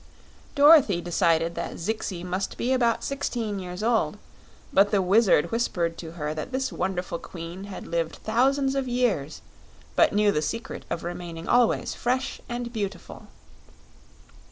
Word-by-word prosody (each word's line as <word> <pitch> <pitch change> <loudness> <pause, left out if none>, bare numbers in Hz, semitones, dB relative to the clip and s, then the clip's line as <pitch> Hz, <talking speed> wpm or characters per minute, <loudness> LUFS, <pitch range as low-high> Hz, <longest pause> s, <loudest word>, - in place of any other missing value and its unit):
Dorothy 285 - +7
decided 170 -1 +1
that - - -5
Zixi 185 -1 -3
must 185 +2 -3
be 255 +2 0
about 235 -3 +2
sixteen 230 -7 -2
years 180 +2 -6
old, 230 0 +1 0.6
but 200 +1 +5
the 205 - +2
Wizard 190 -3 +4
whispered 175 -8 0
to 165 -1 -7
her 150 -3 -3
that 155 +9 -5
this 265 0 -2
wonderful 180 -2 -2
queen 175 +2 -8
had 200 -2 -8
lived 165 -1 -2
thousands 270 +4 +1
of 270 -1 -1
years, 230 - -1 0.5
but - - +5
knew 210 0 +3
the 150 - 0
secret 230 +10 -4
of 170 - -3
remaining 170 -1 -6
always 245 -2 +3
fresh 255 +2 -2
and 240 0 -4
beautiful. 205 -3 -5
200 Hz, 145 wpm, -26 LUFS, 170-240 Hz, 0.6 s, Dorothy